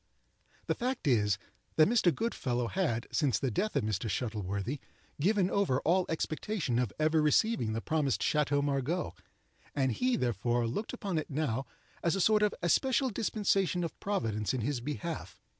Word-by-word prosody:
The - - +1
fact 255 - -2
is, 105 -6 +3 0.4
that 155 - +6
Mr. 215 -5 +4
Goodfellow 125 - -1
had, 145 -12 0
since 135 - +2
the 130 +4 -1
death 215 - -1
of - - +2
Mr. 110 +1 -1
Shuttleworthy, 105 +3 -2 0.4
given 195 +2 +3
over 185 -11 +2
all 180 +3 +2
expectation 160 - -1
of 125 -5 0
ever 155 +1 +3
receiving 150 - +2
the 115 - -2
promised 140 -10 0
Chateau 145 -1 +2
Margaux; 145 +5 -1 0.6
and 135 -2 +2
he, 250 - +1
therefore, 120 - 0
looked 170 - -3
upon 195 -9 -2
it - - -6
now 135 -4 -1 0.3
as 170 +1 +1
a - - -1
sort 215 +3 +4
of 210 -1 +2
especial 260 - +2
dispensation 195 -4 +1
of 165 - -5
Providence 115 - -1
in 125 - -1
his 125 +2 -1
behalf. 155 +5 -5
150 Hz, 160 wpm, -31 LUFS, 120-195 Hz, 0.6 s, that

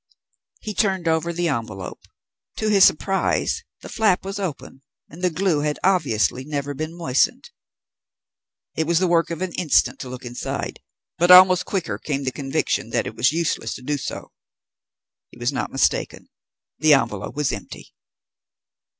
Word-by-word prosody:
He 215 - -5
turned 190 -4 0
over 160 +1 +1
the 175 0 -1
envelope. 110 - -4 0.6
To 215 - 0
his 200 -2 +5
surprise, 195 +4 +2 0.2
the - - -9
flap 215 -5 +1
was 195 +1 -4
open 150 -7 -6 0.3
and 165 +4 -11
the 180 - +2
glue 175 -2 0
had 150 0 -1
obviously 140 - +1
never 145 0 -4
been 155 +4 -6
moistened. 160 -6 0 1.2
It 160 -1 -1
was 170 0 +2
the 185 - +3
work 170 -1 +2
of 170 +2 -4
an 185 - -4
instant 165 -6 +2
to 130 - -7
look 125 0 -8
inside, 120 0 -5 0.4
but 175 +1 +3
almost 185 0 +8
quicker 115 - -3
came 140 +1 -3
the 130 - -1
conviction 135 0 -2
that - - 0
it - - -6
was 125 +4 +3
useless 160 -8 -2
to 130 - -10
do 145 +2 -2
so. - - -6 1.0
He - - -17
was 120 +2 -1
not 125 - -3
mistaken. 135 - -1 0.5
The 155 -2 +6
envelope 115 -5 -2
was 150 -2 0
empty. - - -9
155 Hz, 160 wpm, -22 LUFS, 135-180 Hz, 1.2 s, almost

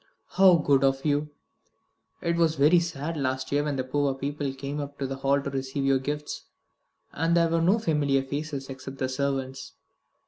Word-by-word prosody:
"How 190 -2 +6
good 140 -3 +2
of 135 +1 +1
you! 150 0 +1 0.9
It 170 0 0
was 165 -2 +2
very 150 +5 +5
sad 165 -2 -4
last 130 -1 -2
year 145 +1 +2
when 150 -1 -2
the 130 - -1
poor 140 +1 0
people 140 +1 -3
came 140 +2 -5
up 140 0 -6
to 140 - -3
the 135 0 -4
Hall 140 +1 +2
to 140 - -4
receive 135 +1 -3
your 135 -1 +3
gifts, 145 +2 -4 0.7
and 165 +2 +1
there 170 -1 +3
were 165 0 +1
no 185 +6 +4
familiar 145 -9 +1
faces, 140 0 -4
except 135 0 -8
the 130 - -1
servants. 135 0 -3
140 Hz, 185 wpm, -27 LUFS, 135-150 Hz, 0.9 s, How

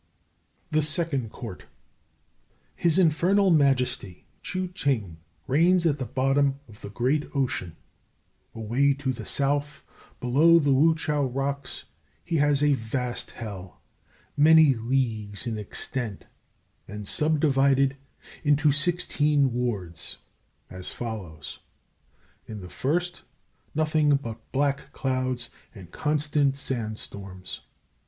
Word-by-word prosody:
THE 155 0 +3
SECOND 150 -6 -1
COURT. - - -8 1.1
His 170 -1 +2
Infernal 185 +3 +4
Majesty, 125 - +1 0.2
Ch'u 185 -1 -3
Ching, 110 - -1 0.3
reigns 170 +6 +3
at 150 -3 +2
the 130 - -3
bottom 135 +1 +1
of 105 -2 -16
the 100 - -7
great 130 +8 0
Ocean. 120 - -1 0.8
Away 125 +6 +2
to 135 -1 -2
the 115 -4 -8
south, 145 +1 -1 0.3
below 150 +7 +5
the 145 -4 +3
Wu 160 +5 +5
chiao 150 -3 0
rocks, 135 +1 -3 0.4
he 170 -1 0
has 145 -1 +3
a 150 -1 +5
vast 125 0 -3
hell, 95 -5 -8 0.6
many 155 -1 +7
leagues 115 -3 -2
in 115 -3 -3
extent, 105 0 -4 0.6
and 105 0 -7
subdivided 140 -2 +2 0.5
into 145 0 +4
sixteen 150 -3 +2
wards, 105 -9 -2 0.5
as 90 0 -6
follows: 95 -10 -6 0.9
In 110 -2 -7
the 90 - -9
first, 175 +5 -1 0.5
nothing 155 -1 +3
but 115 -5 -6
black 140 +1 0
clouds 130 -3 -2 0.2
and 95 -4 -12
constant 150 -2 +1
sand 120 -6 -3
storms. 95 -3 -6
135 Hz, 110 wpm, -26 LUFS, 115-150 Hz, 1.1 s, many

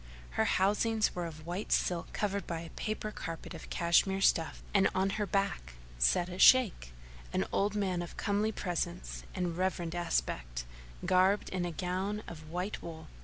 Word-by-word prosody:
Her 65 - +1
housings 210 +3 +2
were 175 -1 -3
of 155 -1 -10
white 180 +5 -4
silk 175 -2 +1
covered 200 -1 -1
by 165 -1 -3
a 165 - -9
prayer 215 -1 -3
carpet 165 -4 -6
of 165 - -9
Cash 170 +2 +3
mere 195 0 -1
stuff, 165 -4 +2
and 195 -1 +5
on 190 +1 +2
her 205 - 0
back 195 - -1 0.3
sat 60 - +3
a 180 0 -7
Shaykh, 215 - +6 0.4
an 95 - +1
old 205 +1 +1
man 190 -4 0
of 175 - -7
comely 205 +2 +1
presence 175 -3 -3
and 180 -3 -1
reverend 180 -2 -1
aspect, - - -2 0.4
garbed 190 +2 +3
in 185 -1 -1
a 175 - -2
gown 185 +5 -2
of 155 -2 -9
white 180 +5 -3
wool. 160 -1 -8
180 Hz, 170 wpm, -32 LUFS, 165-200 Hz, 0.4 s, Shaykh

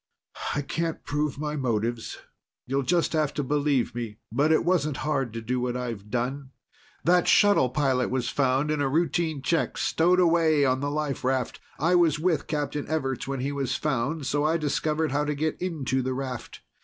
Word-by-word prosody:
"I 145 - -1
can't 165 +3 -3
prove 145 -1 -1
my 150 +1 -3
motives. 120 -3 -2 0.5
You'll 135 +2 0
just 170 +6 +1
have 155 -2 0
to 145 - -1
believe 140 -2 +1
me. 115 -3 -5
But 150 +3 +2
it 160 - +3
wasn't 155 -6 +1
hard 135 -5 0
to 115 - -4
do 125 +3 -1
what 125 0 -1
I've 115 -5 -5
done. 130 +4 -2 0.5
That 180 +1 +3
shuttle 205 -11 +5
pilot 130 -1 +1
was 125 -1 -1
found 135 +2 +1
in 150 -1 0
a 135 - +1
routine 160 -1 0
check, 165 +3 0
stowed 180 +3 +2
away 165 -4 +4
on 130 0 +2
the 145 +1 -1
life 145 -2 -2
raft. 130 -1 -1 0.2
I 165 +5 +2
was 170 -4 +4
with 160 -2 0
Captain 145 -1 -2
Everts 135 -5 -2
when 135 -2 -3
he 140 +2 -1
was 140 -3 -1
found, 145 +1 -1
so 145 +2 0
I 160 +2 +2
discovered 155 0 0
how 145 +1 +1
to 150 0 -1
get 155 +2 -2
into 140 -7 -1
the 130 0 -2
raft. 130 -2 -6
145 Hz, 190 wpm, -26 LUFS, 130-155 Hz, 0.5 s, shuttle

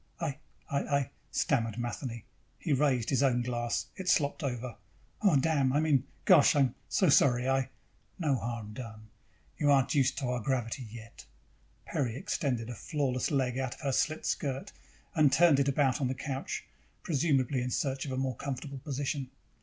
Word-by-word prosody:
"I, 150 -4 -3 0.3
I, 140 - -1
I," 140 -2 0 0.2
stammered 115 -5 0
Matheny. 120 -1 -4 0.3
He 155 - -1
raised 130 -4 +2
his 135 - +2
own 125 -3 +3
glass. 120 -1 -1
It 185 -1 -3
slopped 145 +1 +2
over. 125 -4 -3 0.5
"Oh, 200 -7 +4
damn! 140 -2 +2
I 145 - +3
mean... 145 -4 +2 0.2
gosh, 170 -8 +6
I'm 135 -3 +3 0.2
so 185 - +3
sorry, 130 -3 +4
I 135 0 +1 0.2
" - - -38
"No 140 - +4
harm 115 -3 -4
done. 110 -2 -9 0.5
You 145 - +3
aren't 135 -2 +4
used 135 -3 +2
to 135 - -2
our 125 0 -1
gravity 125 0 -2
yet." 115 - -11 0.6
Peri 120 -5 -1
extended 125 -4 -2
a 120 - -5
flawless 130 +1 -1
leg 130 -4 0
out 130 -2 -2
of - - -16
her 140 -3 0
slit 155 +4 0
skirt 135 -2 -2 0.4
and 150 -4 +4
turned 155 0 +5
it 140 - +2
about 140 -1 +2
on 130 - +2
the 130 - -2
couch, 135 0 -4 0.4
presumably 140 -4 +1
in 125 - -2
search 135 +1 -1
of - - -4
a 130 - -2
more 130 -1 -1
comfortable 140 +1 -5
position. 140 -1 -3
135 Hz, 175 wpm, -30 LUFS, 125-145 Hz, 0.6 s, gosh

